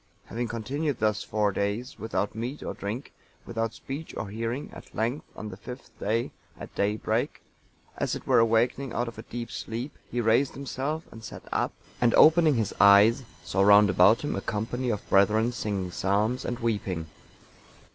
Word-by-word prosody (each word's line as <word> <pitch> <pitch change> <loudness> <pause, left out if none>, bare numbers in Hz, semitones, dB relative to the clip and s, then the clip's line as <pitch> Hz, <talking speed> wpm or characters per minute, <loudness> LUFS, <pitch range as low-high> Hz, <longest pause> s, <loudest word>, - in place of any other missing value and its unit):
Having 120 +1 -2
continued 130 +6 -2
thus 105 -1 +1
four 105 -1 +1
days, 100 +7 -3
without 105 -2 -2
meat 120 +6 -5
or - - -4
drink, 110 +7 -5 0.3
without 115 -1 -2
speech 145 +4 -7
or 105 - -4
hearing, 115 +6 -4
at - - -12
length, 120 +7 -1
on 110 - -6
the 95 - -9
fifth 125 +5 -10
day, 115 +3 0 0.3
at - - -9
daybreak, 105 +2 -1 0.6
as - - 0
it - - -8
were - - +4
awakening 115 +3 +2
out 120 +1 -1
of 115 - -8
a - - -4
deep 120 -1 -6
sleep, 120 +6 -5
he 120 - -2
raised 115 +4 +2
himself 140 +3 -3
and 110 - -11
sat - - -8
up, - - 0 0.3
and 120 -1 +4
opening 160 -2 +6
his 110 -3 -1
eyes, 100 +5 +7 0.2
saw 95 - 0
round 100 0 +7
about 95 +5 +5
him 145 - -1
a 100 - -2
company 120 +5 -2
of 105 -3 -3
brethren 105 +4 +4
singing 100 -6 -3
psalms 105 +8 0
and 120 - -2
weeping. 100 -8 -2
115 Hz, 175 wpm, -27 LUFS, 105-125 Hz, 0.6 s, eyes